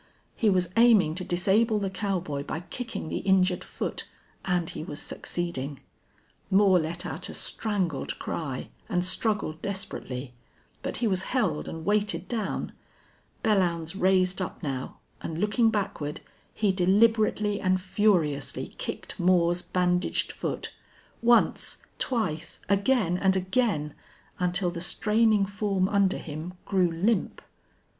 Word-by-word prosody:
He 220 - +2
was 180 -3 +2
aiming 225 -9 +6
to 185 +3 -4
disable 205 +6 +2
the 195 -2 -2
cowboy 185 -7 -2
by 155 +3 -4
kicking 230 +1 -6
the - - -2
injured 185 -2 +2
foot. - - -5 0.4
And 180 -2 0
he - - -5
was 150 -2 -4
succeeding. 145 -6 -2 0.7
Moore 190 -1 +5
let 170 +3 -3
out - - -4
a - - -5
strangled 185 -10 -1
cry, 135 -6 -4 0.2
and 180 0 +1
struggled 185 -5 0
desperately. 135 -10 -5 0.5
But - - -3
he 235 - +1
was 190 -3 +1 0.2
held 180 -11 0
and 160 0 -6
weighted 205 -4 0
down. 220 -5 -2 0.7
Belllounds 175 -7 +1
raised 185 -1 +3
up 185 - -5
now 135 -3 -4 0.2
and, 160 - -4
looking 210 +5 +3
backward, 195 -9 -2 0.3
he 210 -3 +1
deliberately 210 +2 +3
and 185 0 +2
furiously 180 -8 +1
kicked - - -5
Moore's 175 -1 +3
bandaged 180 0 0
foot; - - -4 0.5
once, 235 0 +3 0.2
twice, 170 -10 -1
again 200 -3 +2
and 190 0 +3
again, 185 - 0 0.5
until 180 0 +1
the 170 -1 -5
straining 215 +2 +3
form 200 -1 0
under 200 -1 +2
him 160 +3 -6
grew 185 -3 +2
limp. 190 +8 0
185 Hz, 130 wpm, -27 LUFS, 170-205 Hz, 0.7 s, aiming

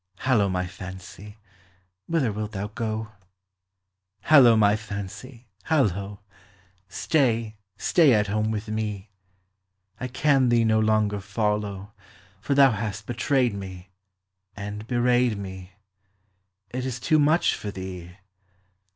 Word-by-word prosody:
Hallo, 115 -7 +2
my 90 0 -1
fancy, 95 +3 -10 0.7
whither 160 -9 +1
wilt 105 +1 -5
thou 100 +1 -4
go? 110 0 -4 1.1
Hallo, 130 -7 +7
my 105 -1 +4
fancy, 110 +4 -8 0.2
hallo! 100 - 0 0.7
Stay, 115 - 0 0.2
stay 160 -6 +4
at 105 -1 +2
home 105 +1 -1
with 110 -1 -3
me, 105 -2 -4 0.9
I 125 - -3
can 135 0 +2
thee 120 -1 +3
no 110 -1 +3
longer 110 -1 +1
follow, 105 -1 -2 0.5
For 140 - -1
thou 135 -2 +6
hast 110 -1 -4
betrayed 125 0 +1
me, 95 -1 -8 0.6
And 105 +2 -7
bewrayed 120 -2 +2
me; 95 -2 -8 1.0
It 125 +1 -3
is 130 -1 -4
too 155 +6 +2
much 155 +4 +3
for 105 - -5
thee. 90 -2 -8
110 Hz, 115 wpm, -25 LUFS, 100-120 Hz, 1.1 s, Hallo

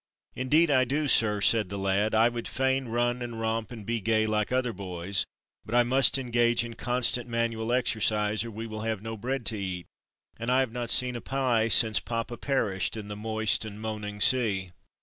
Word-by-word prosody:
"Indeed, 150 +5 +2
I 130 -2 +4
do, 145 +4 -1
sir," 105 -5 +4
said 105 0 +4
the 100 - -5
lad. 100 +3 0
"I 110 +2 +5
would 120 -1 -4
fain 130 0 -1
run 120 +1 -1
and 120 -2 -6
romp 115 +1 -2
and 110 -4 -9
be 115 0 -2
gay 110 +1 +1
like 105 0 -1
other 125 -2 0
boys, 90 -1 -3 0.4
but 115 - -4
I 120 - +5
must 130 +3 +4
engage 120 -2 +1
in 115 - -8
constant 120 +1 -1
manual 115 -1 -2
exercise, 110 -4 +1
or 115 - -7
we 110 +1 -7
will 110 -1 -7
have 110 -2 -3
no 110 0 -5
bread 125 +3 -4
to 110 -2 -1
eat, 95 -3 -4 0.5
and 115 +1 -4
I 130 +1 +4
have 130 -4 -2
not 120 -1 -4
seen 125 +1 +3
a 120 - -5
pie 125 -5 0
since 110 0 +5
papa 115 0 -4
perished 110 -8 -1
in 105 -1 -7
the 105 - -5
moist 110 0 0
and 105 -1 -8
moaning 105 -1 -6
sea." 105 -8 +3
115 Hz, 205 wpm, -27 LUFS, 105-120 Hz, 0.5 s, I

